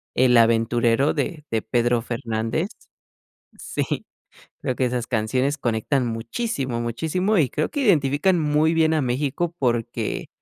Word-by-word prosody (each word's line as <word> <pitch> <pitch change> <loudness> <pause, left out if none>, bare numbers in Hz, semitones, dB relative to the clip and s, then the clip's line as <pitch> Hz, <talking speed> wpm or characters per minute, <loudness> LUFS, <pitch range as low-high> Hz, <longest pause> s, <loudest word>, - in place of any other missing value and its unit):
"El 125 -1 +4
Aventurero" 115 +3 +3
de 150 +1 -3
de 110 - +1
Pedro 120 +1 +1
Fernández. 115 - -2 0.9
Sí, - - -3 0.6
creo 130 -4 -2
que 130 - +1
esas 120 -1 -2
canciones 130 +5 0
conectan 120 +2 0
muchísimo, 120 - -3
muchísimo. 165 - 0
Y 140 -6 +2
creo 155 - -1
que 290 - -2
identifican 165 - +3
muy 150 +2 +2
bien 160 -1 +3
a 155 - +1
México 145 +7 -1
porque 120 -3 -1
130 Hz, 130 wpm, -23 LUFS, 115-155 Hz, 0.9 s, El